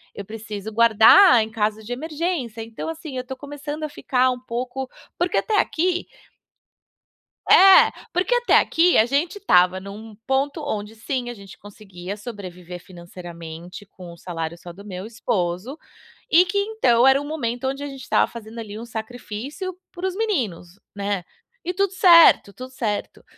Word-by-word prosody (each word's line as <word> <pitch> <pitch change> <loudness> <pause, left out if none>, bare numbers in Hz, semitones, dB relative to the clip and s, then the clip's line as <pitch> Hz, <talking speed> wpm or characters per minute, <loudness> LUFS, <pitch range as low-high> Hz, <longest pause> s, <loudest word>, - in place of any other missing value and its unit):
Eu 200 - -6
preciso 215 0 -7
guardar 230 - +6
em 220 - -7
caso 215 -1 -1
de 225 - -9
emergência". 300 -5 -3
Então, 225 +6 -7
assim, 315 -4 -7
eu 255 - -4
tô 265 +1 -6
começando 290 +2 -7
a 305 - -3
ficar 255 -3 +1
um 250 - -5
pouco 250 +2 -5 0.3
porque 350 +1 0
até 430 -3 +1
aqui 355 +2 0 1.4
é, 385 0 +8 0.2
porque 365 +7 0
até 485 0 +1
aqui 345 +2 +3
a 220 - +5
gente 290 +10 -1
estava 180 - +3
num 205 +3 -10
ponto 275 +3 -1
onde 215 -6 -4
sim, 245 +2 -4
a - - -5
gente 200 -4 -13
conseguia 200 -2 -9
sobreviver 180 -5 -9
financeiramente 175 0 -10
com 185 -3 -12
o 170 - -13
salário 165 -1 -5
só 175 0 -11
do 200 +3 -13
meu 190 -1 -7
esposo 220 - -3 0.5
e 350 +3 +6
que, 360 +3 -3
então, 400 - +2
era 270 +1 +5
o - - -7
momento 265 -4 -3
onde 275 +2 -3
a 285 - -4
gente 270 -1 -9
estava - - +1
fazendo, 230 -1 -10
ali, 215 -1 -7
um 230 - -7
sacrifício 245 - -7
para 370 +1 -4
os 375 - -4
meninos, 220 - -3 0.2
né, 200 -2 -2 0.4
e 360 - -3
tudo 390 0 0
certo, 335 - +6
tudo 255 +4 -9
certo. 220 -5 -4
235 Hz, 165 wpm, -22 LUFS, 200-295 Hz, 1.4 s, é